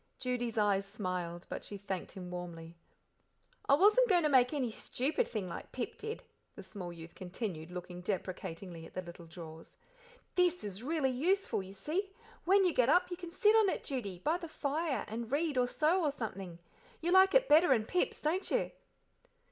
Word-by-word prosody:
Judy's 245 -3 -2
eyes 205 -2 +3
smiled, 185 -4 -4
but - - -5
she 205 - -6
thanked 190 -2 -5
him 180 -2 -7
warmly. 170 -2 -7 0.9
"I 280 - +8
wasn't 430 +9 +5
goin' 355 -4 +4
to 300 - +3
make 255 -3 +5
any 265 -6 -1
stupid 295 - -1
thing, 205 -5 -3
like 170 - -7
Pip 245 -2 -4
did," 445 +2 -5 0.3
the - - -9
small 180 -4 -7
youth 165 0 -10
continued, 180 -3 -5
looking 180 0 -7
deprecatingly 180 -2 -4
at - - -20
the 185 - -3
little 170 -1 -11
drawers. 160 -1 -10 0.6
"This 360 -1 +2
is 205 0 -5
really 285 0 0
useful, 350 - +1
you 190 0 -10
see; 350 - -2 0.4
when 385 +2 +5
you 355 - +3
get 250 0 +3
up 360 +3 +4
you - - -1
can 350 -1 -7
sit 425 +3 +4
on 435 -3 +5
it, - - -2
Judy, 230 - -3
by 310 - 0
the 340 - -6
fire 295 -3 -1
and 225 +2 -5
read 300 +1 +1
or 250 -1 +3
sew 325 +8 +2
or 300 - +3
something. 195 -10 -5 0.4
You 340 +2 -1
like 380 +3 +6
it - - +5
better 315 +1 +6
'n 225 -4 +3
Pip's, 360 +9 -1
don't 335 +6 0
you?" - - +1
245 Hz, 190 wpm, -33 LUFS, -, 0.9 s, I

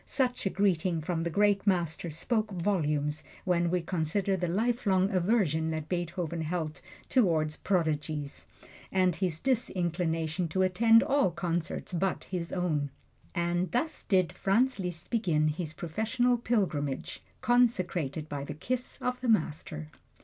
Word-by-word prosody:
Such 250 -6 0
a - - +2
greeting 185 -4 +1
from 165 +1 -2
the 170 - -1
great 205 +2 +2
Master 175 -3 +1
spoke 215 - -1
volumes 155 -6 0 0.2
when 175 -1 +2
we 180 +1 +1
consider 180 +3 0
the 180 -1 -1
lifelong 200 -1 +1
aversion 175 -5 +2
that 155 -1 -3
Beethoven 175 -1 -2
held 160 -1 -3 0.3
toward 160 - +2
"prodigies," 155 -5 -1 0.4
and 185 -2 +3
his 175 -5 -1
disinclination 175 - 0
to 185 +4 +1
attend 225 +5 +5
all 280 -6 +3
concerts 170 0 -3
but 185 +2 0
his 175 -3 -4
own. 155 -6 0 0.5
And 175 +1 0
thus 305 +6 -1
did 185 -4 +2
Franz 235 +5 +2
Liszt 180 -3 -5
begin 165 -10 +2
his 155 +1 -3
professional 225 +10 0
pilgrimage, 175 - -1 0.2
consecrated 180 - +1
by 145 -2 -4
the 140 - -6
kiss 250 +10 -3
of 250 0 -1
the 250 - -1
Master. 150 - 0
180 Hz, 135 wpm, -30 LUFS, 160-205 Hz, 0.5 s, attend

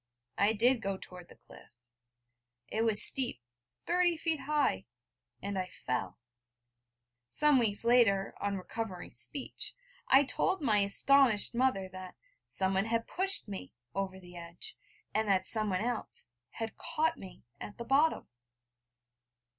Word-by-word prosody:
I 205 +2 +3
did 240 +3 +3
go 195 -2 -2
toward 180 -2 -12
the - - -15
cliff: - - -17 1.0
it 220 - -1
was 225 -2 +3
steep, 255 - +5 0.5
thirty 350 -1 +2
feet 320 -1 -1
high, 295 +2 0 0.6
and 200 -1 -3
I 185 - -3
fell. 125 - -4 1.1
Some 295 - +4
weeks 220 -1 -1
later, 225 -5 +3
on 200 -1 -1
recovering 190 -1 -6
speech, 125 - -3 0.3
I 270 +2 +6
told 375 +7 0
my 225 -9 +2
astonished 220 +3 +4
mother 240 -6 +1
that 185 0 -10 0.3
'someone 190 +1 0
had 230 0 -1
pushed 380 - +1
me' 195 -2 -8 0.2
over 190 -1 -3
the 180 -1 -14
edge, 170 - -8 0.4
and 220 0 0
that 190 -2 +2
someone 210 -4 +2
else 240 0 -3 0.2
'had 225 -1 -6
caught 320 -1 -1
me' 190 - -12 0.2
at 205 - -9
the 235 - -7
bottom! 285 +6 +2
220 Hz, 135 wpm, -31 LUFS, 190-265 Hz, 1.1 s, I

